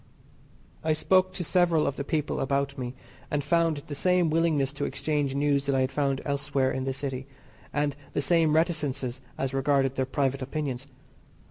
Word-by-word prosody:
I 160 0 +2
spoke 185 +4 +3
to 180 - -3
several 175 -2 +3
of 140 - -1
the 140 - -3
people 150 0 -1
about 140 +1 0
me, 125 -1 -5 0.3
and 145 -1 0
found 165 -1 +2
the 150 - -6
same 180 +2 +2
willingness 155 -4 +2
to 145 - -2
exchange 145 -3 -1
news 140 0 +1
that 140 - +2
I 130 - +3
had 130 +1 0
found 135 -1 0
elsewhere 140 -2 +1
in 130 0 -2
the 135 - 0
City, 130 -1 -4 0.4
and 145 -1 0 0.2
the - - 0
same 160 +1 +3
reticences 140 -6 0 0.2
as 135 -1 -2
regarded 135 -1 +2
their 130 -1 +1
private 135 0 0
opinions. 135 -1 -3
140 Hz, 175 wpm, -27 LUFS, 135-155 Hz, 0.4 s, spoke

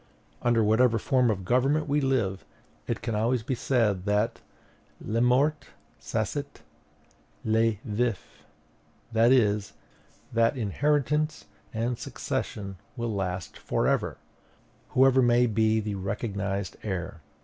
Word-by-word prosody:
Under 120 -2 +3
whatever 115 +2 +4
form 125 +2 +2
of 100 -4 -2
government 135 +8 +2
we 145 +1 +1
live, 115 -9 0 0.4
it - - -3
can 115 - -2
always 115 +2 +1
be 130 - -2
said 110 -7 +1
that 105 +2 0 0.6
le 115 +2 -1
mort 135 +5 +2 0.3
saisit - - -3 0.8
le 110 +1 +3
vif; 115 -1 -2 0.7
that 115 +2 +4
is, 105 -5 +2 0.6
that 115 +3 +2
inheritance 150 - 0 0.3
and 115 +2 -2
succession 100 -2 -4 0.2
will 120 -2 -2
last 95 -2 -4
for - - -1
ever, - - 0 0.7
whoever 130 0 +5
may 120 0 +4
be 110 -1 +2
the 105 -1 -3
recognized 100 0 -3
heir. 90 -5 -4
115 Hz, 115 wpm, -27 LUFS, 105-125 Hz, 0.8 s, whoever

